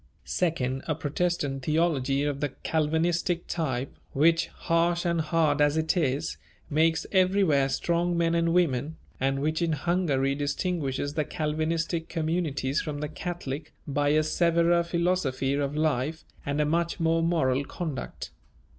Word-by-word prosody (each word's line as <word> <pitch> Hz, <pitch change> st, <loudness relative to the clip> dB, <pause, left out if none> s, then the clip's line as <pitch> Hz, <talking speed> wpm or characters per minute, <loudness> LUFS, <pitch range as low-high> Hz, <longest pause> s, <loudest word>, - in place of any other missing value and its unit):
Second, 135 Hz, -7 st, -1 dB
a 155 Hz, -, 0 dB
Protestant 150 Hz, -2 st, -1 dB
theology 145 Hz, -3 st, +1 dB
of 145 Hz, -1 st, -1 dB
the 145 Hz, 0 st, -1 dB
Calvinistic 165 Hz, +2 st, 0 dB
type, 135 Hz, -6 st, -2 dB, 0.2 s
which, 165 Hz, +4 st, +3 dB
harsh 170 Hz, +1 st, 0 dB
and 170 Hz, -1 st, +1 dB
hard 155 Hz, -2 st, +2 dB
as 145 Hz, +1 st, +3 dB
it 160 Hz, +3 st, +1 dB
is, 150 Hz, -3 st, 0 dB, 0.3 s
makes 160 Hz, +1 st, +2 dB
everywhere 185 Hz, -8 st, +3 dB
strong 170 Hz, +4 st, 0 dB
men 165 Hz, 0 st, +2 dB
and 170 Hz, 0 st, +2 dB
women, 160 Hz, -3 st, +1 dB, 0.2 s
and 135 Hz, +1 st, 0 dB
which 155 Hz, +2 st, 0 dB
in 165 Hz, -2 st, +1 dB
Hungary 150 Hz, -4 st, +1 dB
distinguishes 145 Hz, -1 st, -2 dB
the 155 Hz, -, 0 dB
Calvinistic 160 Hz, +1 st, -2 dB
communities 155 Hz, -4 st, -1 dB
from 150 Hz, -2 st, -4 dB
the 150 Hz, 0 st, -3 dB
Catholic 160 Hz, -3 st, -5 dB
by 145 Hz, 0 st, +1 dB
a 155 Hz, +1 st, +3 dB
severer 170 Hz, +2 st, +3 dB
philosophy 170 Hz, -6 st, 0 dB
of 140 Hz, 0 st, -1 dB
life 155 Hz, 0 st, 0 dB, 0.2 s
and 140 Hz, +1 st, -1 dB
a 150 Hz, -, +3 dB
much 170 Hz, +4 st, 0 dB
more 165 Hz, 0 st, +2 dB
moral 145 Hz, -6 st, +1 dB
conduct. 150 Hz, -2 st, -5 dB
160 Hz, 140 wpm, -27 LUFS, 145-170 Hz, 0.3 s, which